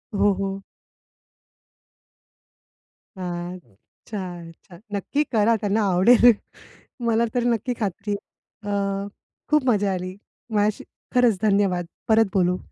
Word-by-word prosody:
हो, 205 +1 +4
हो. 195 0 -2 2.6
हां. 175 0 -4
अच्छा, 120 - -11 0.3
अच्छा. 170 +2 -16 0.2
नक्की 245 +9 0
करा 225 0 +3
त्यांना 205 +2 +1
आवडेल. 235 +6 +7 0.8
मला 230 0 +3
तरी 245 -1 +1
नक्की 235 +1 0
खात्री 205 0 -2
आहे. 205 +1 -9
अ, 200 0 -1 0.4
खूप 300 -2 +3
मजा 205 -3 +2
आली. 185 0 -4 0.4
माझ्याशी 210 0 +1 0.3
खरंच 245 -5 +4
धन्यवाद. 195 -4 +2 0.2
परत 225 0 +5
बोलू. 180 -1 +2
200 Hz, 110 wpm, -23 LUFS, 185-225 Hz, 2.6 s, आवडेल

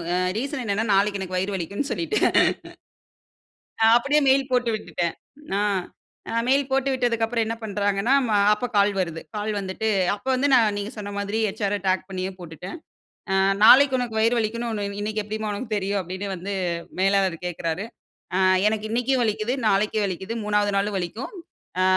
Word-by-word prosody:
A - - +1 0.2
reason 275 +1 -3
என்னனா, 210 +2 0
நாளைக்கு 200 +1 +2
எனக்கு 185 -1 -3
வயிறு 195 +2 -1
வலிக்குன்னு 200 - -3
சொல்லிட்டேன் 380 +6 +1 1.5
ஆ. 225 - +7
அப்படியே 280 +5 +3
மெயில் 270 0 +3
போட்டு 245 -2 +2
விட்டுட்டேன். 175 -5 -3 0.4
ஆ. - - +1 0.7
அ - - -4 0.2
மெயில் 275 +1 +2
போட்டு 270 0 +1
விட்டதுக்கு 240 -3 +1
அப்புறம் 230 0 0
என்ன 225 - -2
பண்றாங்கன்னா, 205 +3 +1 0.4
அப்போ 210 +4 -3
கால் 200 0 +4
வருது. 165 -3 -3 0.2
கால் 210 +1 -2
வந்துட்டு, 195 +3 -3 0.3
அப்போ 205 +6 -9
வந்து 265 +3 +1 0.3
நீங்க 205 +1 -4
சொன்ன 205 -1 -6
மாதிரி 200 +2 -2
ஹெச்.ஆர்ர 205 0 -2
டேக் 185 0 0
பண்ணியே 185 0 -3
போட்டுட்டன். 175 - -8 0.5
அ - - +2 0.3
"நாளைக்கு 260 +4 +8
உனக்கு 235 -3 -3
வயிறு 230 +2 +3
வலிக்குன்னு 230 +2 -2
ஒண்ணு 210 -2 -3 0.2
இன்னைக்கு 215 +1 -2
எப்படிம்மா 215 +1 -4
உனக்கு 220 +2 -5
தெரியும்?" 200 0 -1
அப்படின்னு 185 +3 -5
வந்து 190 +3 -5 0.5
மேலாளர் 195 -2 +2
கேட்கறாரு. 170 +1 -3 0.5
ஆ - - +2 0.3
எனக்கு 215 0 -1
இன்னைக்கும் 245 +3 +1
வலிக்குது, 215 +2 -1
நாளைக்கு 210 +1 +2
வலிக்குது, 190 +3 -4
3வது 210 0 +1
நாளும் 200 +1 0
வலிக்கும். 190 +7 -5 0.5
அ - - +4
210 Hz, 160 wpm, -24 LUFS, 195-235 Hz, 1.5 s, நாளைக்கு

